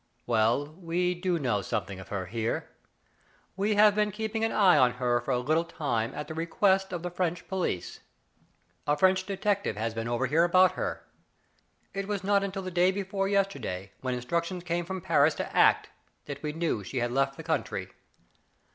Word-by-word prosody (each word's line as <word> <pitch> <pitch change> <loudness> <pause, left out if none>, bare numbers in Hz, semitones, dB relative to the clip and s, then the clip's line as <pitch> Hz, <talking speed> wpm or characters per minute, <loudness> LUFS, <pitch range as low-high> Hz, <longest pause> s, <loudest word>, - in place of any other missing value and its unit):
"Well, 120 +6 +1
we 180 +1 0
do 180 0 -1
know 120 -9 0
something 95 +1 -3
of 95 - -10
her 95 -2 -3
here. 115 +4 -3 0.9
We 205 +2 +1
have 210 0 +6
been 210 0 +1
keeping 220 +2 -3
an 225 - +1
eye 190 -5 +5
on 125 -4 +4
her 125 -1 0
for 120 - -8
a 125 - +2
little 155 +7 +1
time 125 -9 -2
at 150 -1 -5
the 160 - -6
request 190 +4 +1
of 175 -2 -4
the 180 - -3
French 175 -1 -2
police. 180 - -3 0.9
A 145 0 +2
French 185 +3 +3
detective 200 - -1
has 110 +1 -2
been 115 0 -3
over 120 +2 0
here 155 +6 +3
about 185 +1 +5
her. - - -4 0.9
It 195 0 -3
was 205 -2 -2
not 200 0 +3
until 195 -1 -4
the 185 - -5
day 180 +1 +4
before 195 0 -2
yesterday, 140 - -1
when 130 -1 -1
instructions 170 +8 -2
came 175 0 -1
from 190 +1 -5
Paris - - +3
to - - -5
act, - - +4 0.4
that 140 -1 -7
we 150 - -2
knew 160 -9 -1
she 130 - -6
had 120 -1 0
left 135 +1 0
the - - -7
country." - - -2
170 Hz, 190 wpm, -28 LUFS, 125-190 Hz, 0.9 s, have